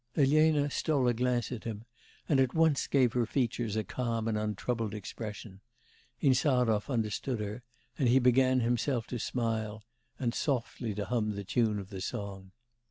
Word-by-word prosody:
Elena 150 Hz, +1 st, +4 dB
stole 140 Hz, -5 st, +1 dB
a 120 Hz, -, +3 dB
glance 125 Hz, 0 st, 0 dB
at 120 Hz, -4 st, -5 dB
him, 110 Hz, -1 st, -6 dB, 0.4 s
and 140 Hz, -4 st, +3 dB
at 130 Hz, +1 st, +2 dB
once 160 Hz, -3 st, +3 dB
gave 130 Hz, -4 st, +3 dB
her 120 Hz, -2 st, +1 dB
features 115 Hz, -4 st, -1 dB
a 110 Hz, -, 0 dB
calm 115 Hz, +1 st, -2 dB
and 110 Hz, -, 0 dB
untroubled 110 Hz, +1 st, -2 dB
expression; 105 Hz, -1 st, -7 dB, 0.6 s
Insarov 125 Hz, -5 st, +3 dB
understood 115 Hz, 0 st, -1 dB
her, 105 Hz, +3 st, -4 dB, 0.4 s
and 130 Hz, -4 st, +3 dB
he 125 Hz, -, +5 dB
began 130 Hz, 0 st, +4 dB
himself 120 Hz, +1 st, 0 dB
to 120 Hz, -, -5 dB
smile, 110 Hz, -3 st, -2 dB, 0.3 s
and 120 Hz, -3 st, -1 dB
softly 120 Hz, -5 st, -2 dB
to 105 Hz, 0 st, -2 dB
hum 105 Hz, -1 st, -1 dB
the 100 Hz, -, -4 dB
tune 110 Hz, +1 st, +1 dB
of 100 Hz, 0 st, -7 dB
the 95 Hz, -2 st, -6 dB
song. 95 Hz, -1 st, -5 dB
120 Hz, 165 wpm, -31 LUFS, 105-130 Hz, 0.6 s, he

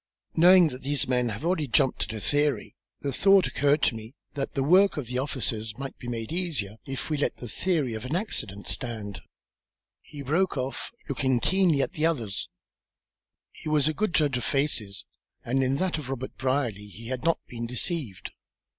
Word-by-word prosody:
Knowing 175 Hz, 0 st, +7 dB
that 130 Hz, -1 st, -8 dB
these 145 Hz, +1 st, 0 dB
men 125 Hz, -2 st, +1 dB
have 115 Hz, +8 st, -5 dB
already 170 Hz, -4 st, +1 dB
jumped 130 Hz, +2 st, +2 dB
at 110 Hz, -, -7 dB
a 110 Hz, -, -4 dB
theory, 145 Hz, 0 st, 0 dB, 0.3 s
the 140 Hz, -, -2 dB
thought 195 Hz, +5 st, +5 dB
occurred 145 Hz, +1 st, +2 dB
to -, -, +4 dB
me 110 Hz, +4 st, -9 dB, 0.2 s
that 140 Hz, -2 st, -4 dB
the 135 Hz, -, +1 dB
work 185 Hz, +6 st, +5 dB
of 145 Hz, -, -2 dB
the 125 Hz, +2 st, -2 dB
officers 115 Hz, -6 st, -2 dB
might 135 Hz, 0 st, -6 dB
be 125 Hz, -, -8 dB
made 115 Hz, 0 st, -4 dB
easier 150 Hz, -, -1 dB
if 135 Hz, +3 st, -4 dB
we 150 Hz, -, +1 dB
let 145 Hz, -, -1 dB
the 120 Hz, -, -7 dB
theory 150 Hz, -, 0 dB
of 110 Hz, 0 st, -5 dB
accident 130 Hz, -, -2 dB
stand." 110 Hz, -5 st, -3 dB, 0.8 s
He 145 Hz, -2 st, -9 dB
broke 160 Hz, +5 st, +1 dB
off, 130 Hz, +1 st, -3 dB, 0.2 s
looking 130 Hz, -3 st, +1 dB
keenly 175 Hz, -2 st, +3 dB
at -, -, -4 dB
the 160 Hz, +1 st, +2 dB
other. 125 Hz, -11 st, -1 dB, 1.2 s
He -, -, -7 dB
was 150 Hz, -1 st, +3 dB
a 155 Hz, -, +1 dB
good 200 Hz, -2 st, -1 dB
judge 145 Hz, -5 st, +3 dB
of 125 Hz, -, -3 dB
faces, 120 Hz, -9 st, 0 dB, 0.4 s
and 130 Hz, +3 st, +1 dB
in 130 Hz, +1 st, +2 dB
that 175 Hz, +1 st, 0 dB
of 135 Hz, -4 st, -8 dB
Robert 130 Hz, -1 st, -4 dB
Brierly 130 Hz, -6 st, -1 dB
he 115 Hz, +3 st, -10 dB
had 130 Hz, +1 st, -3 dB
not 165 Hz, 0 st, +3 dB
been 115 Hz, -1 st, -5 dB
deceived. 125 Hz, -, -2 dB
135 Hz, 190 wpm, -27 LUFS, 120-155 Hz, 1.2 s, Knowing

